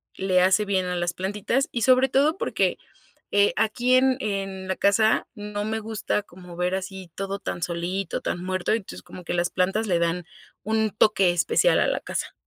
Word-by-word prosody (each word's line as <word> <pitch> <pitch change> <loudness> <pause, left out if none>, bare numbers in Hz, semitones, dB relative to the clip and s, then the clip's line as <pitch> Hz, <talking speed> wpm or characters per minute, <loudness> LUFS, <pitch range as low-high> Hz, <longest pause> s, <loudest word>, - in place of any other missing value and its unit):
le 185 -1 +2
hace 190 +3 +3
bien 190 -2 0
a 180 - -2
las 175 0 -1
plantitas 205 +8 -1
y 235 - -2
sobre 260 0 +5
todo 290 +7 +2
porque, - - 0 0.6
eh, 205 0 +4
aquí 245 +3 +2
en 260 0 +4
en 195 -3 -3
la 190 - -1
casa 215 +2 +3
no 205 -2 -5
me 220 +1 -2
gusta 220 -1 -2
como 180 -2 -13
ver 180 +1 0
así 190 -1 -6
todo 195 0 -4
tan 175 - -5
solito, 180 +3 -2
tan 175 - -3
muerto, 185 -1 -1
entonces, 220 -3 -4
como 180 - -11
que - - -3
las 175 0 0
plantas 190 +4 0
le 175 -3 +2
dan 170 +1 0 0.4
un 220 0 +1
toque 200 -3 +3
especial 175 - +3
a - - +2
la - - 0
casa. - - -4
195 Hz, 195 wpm, -25 LUFS, 180-220 Hz, 0.6 s, sobre